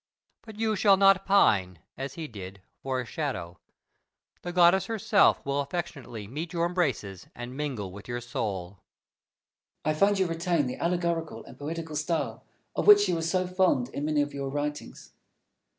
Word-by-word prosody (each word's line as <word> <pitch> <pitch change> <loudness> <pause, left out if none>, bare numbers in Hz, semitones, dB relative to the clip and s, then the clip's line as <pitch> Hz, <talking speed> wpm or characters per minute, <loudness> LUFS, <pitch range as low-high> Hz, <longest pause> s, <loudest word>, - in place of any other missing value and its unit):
But 220 -2 -12
you 220 -1 0
shall 200 -1 +5
not 195 0 +5
pine, 100 - +3 0.2
as 135 +1 -6
he 160 -2 -5
did, 95 -4 -10 0.2
for 130 -1 -2
a - - -7
shadow. 115 - -4 0.8
The 175 - -5
goddess 180 +2 +5
herself 215 -2 +3
will 140 0 0
affectionately 140 - -5
meet 155 - -6
your 170 -1 +1
embraces 135 - -2
and 120 +1 -7
mingle 130 -10 -4
with 100 +2 -11
your 120 0 -3
soul. 100 -6 -4 1.0
Fenelon. 155 - +1
I - - -9
find 200 0 +4
you 190 - +2
retain 165 -2 0
the 125 - -4
allegorical 170 -2 -1
and - - -12
poetical 160 +1 -5
style, 155 +2 -2 0.3
of - - -1
which 410 0 +8
you - - +1
were 165 - -1
so 185 +3 0
fond 180 -9 +1
in 140 +2 -4
many 150 -1 +2
of 145 0 -6
your 140 -1 -4
writings. 145 - -5
155 Hz, 170 wpm, -28 LUFS, 125-180 Hz, 1.0 s, which